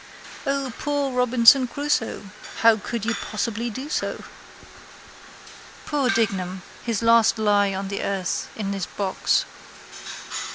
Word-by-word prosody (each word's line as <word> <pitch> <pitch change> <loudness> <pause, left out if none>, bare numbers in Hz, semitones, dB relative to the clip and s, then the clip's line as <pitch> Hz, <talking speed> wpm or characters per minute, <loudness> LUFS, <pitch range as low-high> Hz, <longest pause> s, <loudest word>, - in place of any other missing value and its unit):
O, 275 -3 -1
poor 285 -2 -1
Robinson 250 +1 +5
Crusoe! 240 -7 -2 0.3
How 230 -1 +7
could 225 +1 -4
you 230 - +1
possibly 225 +2 -3
do 260 +6 -6
so? - - -3 1.6
Poor 285 -4 0
Dignam! 190 -4 0 0.2
His 230 -2 -2
last 230 0 +5
lie 205 -2 +2
on 195 +1 -3
the 200 - -3
earth 195 -2 -2
in 200 -2 -3
his 195 -2 -3
box. 195 -2 0
230 Hz, 120 wpm, -24 LUFS, 200-255 Hz, 1.6 s, How